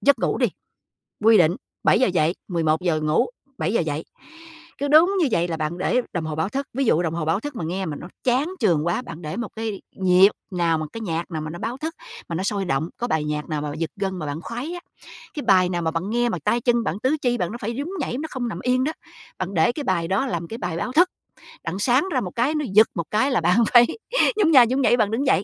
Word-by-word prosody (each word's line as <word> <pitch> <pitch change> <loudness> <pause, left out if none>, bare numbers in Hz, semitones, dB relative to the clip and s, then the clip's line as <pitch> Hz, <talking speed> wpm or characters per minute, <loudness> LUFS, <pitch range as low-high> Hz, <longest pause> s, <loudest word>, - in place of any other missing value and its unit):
giấc 280 -3 +4
ngủ - - 0
đi, - - +3 0.8
quy 225 -1 +7
định, 170 0 +4 0.3
7:00 255 - +4
dậy, 170 -2 +1
11:00 165 -1 0
ngủ, 155 +1 +2 0.3
7:00 180 +7 +1
dậy. 155 -1 -3 0.7
Cứ 285 - -2
đúng 320 +6 +6
như 320 - +3
vậy 170 -3 +1
là 165 -2 -3
bạn 155 +2 -3
để 240 +7 +1
đồng 170 -3 -2
hồ 155 -1 -4
báo 160 +6 -1
thức. 275 +2 -3
Ví 270 +2 0
dụ 175 -7 +3
đồng 165 -2 -1
hồ 170 -2 -2
báo 160 +5 +1
thức 290 +4 -6
mà 180 - -4
nghe 185 +4 -2
mà 155 -4 -4
nó - - -8 0.2
chán 260 +6 +2
chường 160 - +2
quá, 170 +7 0
bạn 170 -9 -9
để 155 +5 -5
một 240 - -3
cái 220 -3 -4
nhịp 185 +1 +5 0.2
nào 170 -3 +1
mà 155 - -3
cái 225 - -6
nhạc 170 -4 -3
nào 160 -2 -3
mà 155 - -5
nó 170 - -8
báo 240 +7 -4
thức, 320 +4 -5 0.3
mà 170 - -3
nó 180 - -2
sôi 200 -1 -1
động, 145 +1 -1
có 240 - -2
bài 160 -9 0
nhạc 150 +1 -3
nào 150 -1 -2
mà 150 - -3
giật 165 0 -2
gân 190 -2 -3
mà 155 - -4
bạn 145 +2 -4
khoái 245 - -5
á, 350 - -5 0.6
cái 295 - -5
bài 185 -2 +5
nào 175 -1 -2
mà 160 - 0
bạn 170 +5 -3
nghe 240 +1 +1
mà 180 - -2
tay 240 - +2
chân 240 0 +2
bạn, 195 - -2
tứ 265 +6 +1
chi 245 -1 +1
bạn 175 -2 -2
nó 235 - -6
phải 230 +2 -3
nhún 285 +5 -4
nhảy, 265 - -2
nó 310 - -3
không 245 -3 -3
nằm 170 - -5
yên 255 +1 +2
đó, 310 - -1 0.5
bạn 185 +1 -4
để 160 +6 +3
cái 295 +3 -5
bài 170 -6 0
đó 195 +9 +1
làm 170 -7 -3
cái 225 - -6
bài 175 -6 -3
báo 250 +9 -3
thức. 350 +6 +5 0.6
Đặng 170 +3 -4
sáng 255 - +2
ra 255 - +1
một 180 - -5
cái, 255 +7 +1
nó 300 -1 -1
giật 215 +2 +7
một 170 -4 -2
cái 260 +7 +2
là 240 - +2
bạn 175 +4 +3 0.2
phải 240 0 +8 0.5
nhún 370 -6 +4
nha 260 -5 +8
nhún 260 +4 0
nhảy, 245 - +4
bạn 215 -2 +1
đứng 255 +6 0
dậy. 195 - +3
195 Hz, 270 wpm, -23 LUFS, 165-245 Hz, 0.8 s, phải